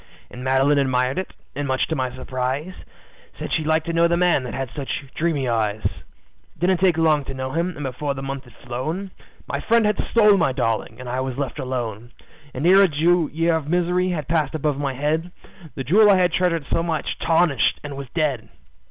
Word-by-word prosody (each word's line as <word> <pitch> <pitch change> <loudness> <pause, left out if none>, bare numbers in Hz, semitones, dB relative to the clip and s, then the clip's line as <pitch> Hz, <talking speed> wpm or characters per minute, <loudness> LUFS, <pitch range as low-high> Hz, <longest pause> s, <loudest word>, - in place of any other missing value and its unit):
And 125 - -8
Madeline 135 +2 +3
admired 130 +2 +1
it, 190 - -5 0.2
and 145 0 -2
much 130 -1 +1
to 160 - -2
my 130 -2 -1
surprise, 130 +6 -3 0.6
Said - - -5
she'd 155 -2 0
like 160 0 +2
to 170 - -4
know 170 +1 +4
the 170 0 +1
man 175 -5 +3
that 120 - -6
had 135 -3 -4
such 140 -1 -4
dreamy 155 -5 0
eyes. 110 -2 0
"It 60 - -9
didn't 180 +1 +2
take 180 -3 +3
long 155 -3 +3
to 135 - -6
know 130 0 -4
him, 170 +3 -1
and 145 - -6
before 140 +2 -3
the 135 - -6
month 135 0 -5
had 120 -1 -17
flown 155 +11 -4 0.4
My - - -2
friend 230 -1 +3
had 210 0 +1
stole 210 -3 +5
my 150 -7 +2
darling, 115 -1 -2
and 130 - -8
I 125 +1 -2
was 130 -1 -3
left 140 -3 -3
alone; 120 -3 -4 0.4
And 135 +4 -4
ere 190 +3 +7
a 195 - +5
year 165 +1 +2
of 160 -3 -3
misery 180 +1 +1
had 155 -6 -3
passed 155 -2 0
above 150 -2 -1
my 140 -2 -2
head, 155 +5 -1 0.5
The 135 - -4
jewel 205 - +5
I 195 - +6
had 180 -2 +2
treasured 170 -4 +1
so 165 - +1
had 165 -3 -2
tarnished 165 -6 +2
and 145 -1 -6
was 140 -1 -7
dead. 145 -8 -1
145 Hz, 215 wpm, -22 LUFS, 130-170 Hz, 0.6 s, ere